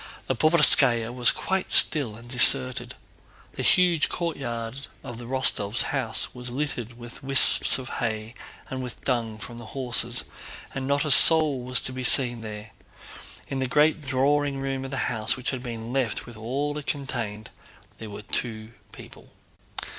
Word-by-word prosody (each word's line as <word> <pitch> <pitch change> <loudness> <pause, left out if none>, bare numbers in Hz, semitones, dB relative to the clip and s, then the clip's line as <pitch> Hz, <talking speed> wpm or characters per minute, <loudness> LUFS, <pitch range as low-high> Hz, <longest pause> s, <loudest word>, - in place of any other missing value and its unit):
The 130 - -2
Povarskáya 135 -6 +4
was 125 -1 +5
quite 190 0 -3
still 135 -9 +3
and 115 +2 -15
deserted. 125 +1 +3 0.6
The - - -6
huge 175 -4 +2
courtyard 135 -6 -5 0.2
of 120 -1 -9
the 120 - -10
Rostóvs' 120 -4 +2
house 125 -5 -3
was 125 0 -9
littered 120 -3 -5
with 120 -1 -13
wisps 135 0 +5
of 130 -1 -9
hay 110 -1 -4 0.3
and 130 0 -6
with 125 -2 -9
dung 115 -4 -2
from 120 +2 -10
the 115 - -11
horses, 125 -5 0 0.5
and 135 -1 -5
not 140 +2 0
a 150 - 0
soul 155 -2 +6
was 125 0 0
to 130 - -2
be 130 0 -6
seen 120 -2 +3
there. 105 0 -9 0.8
In 135 - -5
the 130 - -2
great 150 +4 +1
drawing 140 +1 -1
room 135 -1 -4
of - - -7
the 135 -1 -3
house, 110 +2 -1
which 130 - -4
had 130 -2 -6
been 115 -1 -8
left 130 -5 -2
with 120 - -13
all 135 +7 -4
it 150 - -13
contained, 110 -7 -5 0.5
were 105 -1 -10
two 110 0 -5 0.2
people. - - -15
125 Hz, 160 wpm, -24 LUFS, 115-135 Hz, 0.8 s, soul